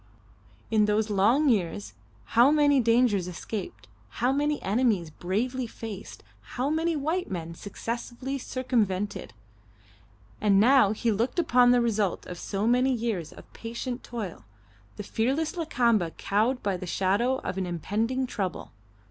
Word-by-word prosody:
In 215 Hz, -1 st, +4 dB
those 210 Hz, +1 st, +1 dB
long 225 Hz, +10 st, +3 dB
years 170 Hz, -, 0 dB, 0.4 s
how 240 Hz, +4 st, +7 dB
many 290 Hz, -2 st, +4 dB
dangers 230 Hz, -5 st, +3 dB
escaped, 175 Hz, -, -6 dB, 0.2 s
how 245 Hz, -, 0 dB
many 295 Hz, +2 st, 0 dB
enemies 200 Hz, -5 st, +1 dB
bravely 235 Hz, -, -2 dB
faced, 220 Hz, -3 st, -8 dB, 0.3 s
how 265 Hz, +4 st, 0 dB
many 325 Hz, +1 st, 0 dB
white 320 Hz, +5 st, -1 dB
men 170 Hz, -3 st, -5 dB
successfully 240 Hz, +8 st, -5 dB
circumvented! 215 Hz, -, -1 dB, 1.1 s
And 200 Hz, -2 st, +4 dB
now 245 Hz, -2 st, +5 dB
he 225 Hz, +2 st, 0 dB
looked 225 Hz, -, -1 dB
upon 250 Hz, -7 st, +4 dB
the 245 Hz, 0 st, +5 dB
result 215 Hz, -5 st, 0 dB
of 175 Hz, -1 st, -8 dB
so 200 Hz, +1 st, -2 dB
many 250 Hz, +3 st, +3 dB
years 225 Hz, -9 st, -2 dB
of -, -, -15 dB
patient 240 Hz, +2 st, -5 dB
toil: 215 Hz, -8 st, -6 dB, 0.5 s
the 205 Hz, -, -6 dB
fearless 270 Hz, -, -1 dB
Lakamba 235 Hz, -, +1 dB
cowed 225 Hz, +6 st, 0 dB
by 195 Hz, -2 st, 0 dB
the 185 Hz, -, -7 dB
shadow 200 Hz, +9 st, +1 dB
of 190 Hz, -, -4 dB
an 185 Hz, -, -2 dB
impending 220 Hz, -, -1 dB
trouble. 195 Hz, -8 st, -4 dB
230 Hz, 140 wpm, -27 LUFS, 195-255 Hz, 1.1 s, how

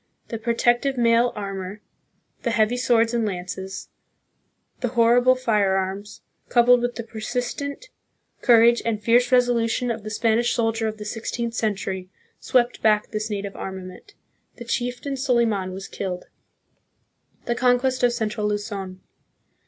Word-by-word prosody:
The 230 Hz, -, -4 dB
protect 240 Hz, +1 st, +2 dB
ive 270 Hz, -1 st, -1 dB
mail 235 Hz, 0 st, +3 dB
armor, 195 Hz, -1 st, -5 dB, 0.6 s
the 240 Hz, -, -1 dB
heavy 230 Hz, +1 st, +2 dB
swords 235 Hz, -2 st, +2 dB
and 235 Hz, -1 st, +1 dB
lances, 190 Hz, -1 st, -5 dB, 0.9 s
the 250 Hz, -, -1 dB
horrible 245 Hz, +2 st, +5 dB
firearms, 200 Hz, -4 st, -1 dB, 0.3 s
coupled 245 Hz, 0 st, +5 dB
with 245 Hz, 0 st, -2 dB
the 235 Hz, -, -5 dB
persistent 245 Hz, -, -4 dB, 0.5 s
courage 235 Hz, -1 st, +5 dB
and 225 Hz, -2 st, -1 dB
fierce 240 Hz, +3 st, +3 dB
resolution 245 Hz, -1 st, +2 dB
of 225 Hz, -1 st, -4 dB
the 215 Hz, -, -7 dB
Spanish 225 Hz, +2 st, +1 dB
soldier 225 Hz, -1 st, 0 dB
of 215 Hz, 0 st, -4 dB
the 210 Hz, -, -8 dB
sixteenth 230 Hz, +2 st, -4 dB
century, 195 Hz, -4 st, -2 dB, 0.3 s
swept 245 Hz, -1 st, +1 dB
back 215 Hz, -1 st, +2 dB
this 215 Hz, 0 st, -3 dB
native 200 Hz, -1 st, -4 dB
armament. 190 Hz, -, -8 dB, 0.4 s
The 240 Hz, -, -9 dB
chieftain 245 Hz, +3 st, -3 dB
Soliman 235 Hz, -8 st, +1 dB
was 190 Hz, +1 st, -7 dB
killed. 180 Hz, -2 st, -5 dB, 1.2 s
The 240 Hz, -, 0 dB
Conquest 255 Hz, +1 st, +2 dB
of 245 Hz, -1 st, +4 dB
Central 215 Hz, -3 st, -2 dB
Luzon. 200 Hz, -3 st, -4 dB
230 Hz, 135 wpm, -23 LUFS, 205-245 Hz, 1.2 s, horrible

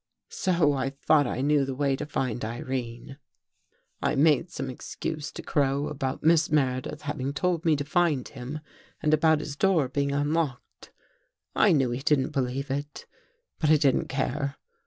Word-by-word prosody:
So 170 Hz, -6 st, +2 dB
I 135 Hz, -1 st, -1 dB
thought 145 Hz, +1 st, +2 dB
I 125 Hz, -, -2 dB
knew 145 Hz, 0 st, +3 dB
the 135 Hz, -1 st, -3 dB
way 140 Hz, 0 st, +1 dB
to 145 Hz, -, -5 dB
find 125 Hz, -5 st, -2 dB
Irene. 120 Hz, +3 st, -5 dB, 0.4 s
" -, -, -44 dB
I -, -, +1 dB
made 150 Hz, +3 st, +3 dB
some 135 Hz, -, -5 dB
excuse 150 Hz, +4 st, -5 dB
to -, -, -7 dB
Crow 140 Hz, 0 st, 0 dB
about 135 Hz, -2 st, -3 dB
Miss 160 Hz, 0 st, +4 dB
Mere 130 Hz, -4 st, +2 dB
dith 150 Hz, +4 st, -7 dB
having 140 Hz, -2 st, -3 dB
told 170 Hz, +2 st, 0 dB
me 160 Hz, -2 st, +4 dB
to 145 Hz, 0 st, -3 dB
find 155 Hz, -4 st, +1 dB
him 135 Hz, +3 st, -7 dB, 0.4 s
and 155 Hz, -1 st, +3 dB
about 155 Hz, 0 st, +4 dB
his 145 Hz, -2 st, -6 dB
door 170 Hz, -4 st, +2 dB
being 140 Hz, +2 st, -1 dB
unlocked. 145 Hz, -2 st, -2 dB, 0.6 s
I -, -, +5 dB
knew 135 Hz, -6 st, +2 dB
he 120 Hz, +2 st, -3 dB
didn't 145 Hz, -1 st, +2 dB
believe 135 Hz, 0 st, -2 dB
it, 145 Hz, +2 st, -4 dB, 0.5 s
but 155 Hz, -, +1 dB
I 155 Hz, -, +7 dB
didn't 140 Hz, -3 st, +2 dB
care. 140 Hz, +1 st, -2 dB
140 Hz, 175 wpm, -27 LUFS, 135-155 Hz, 0.6 s, I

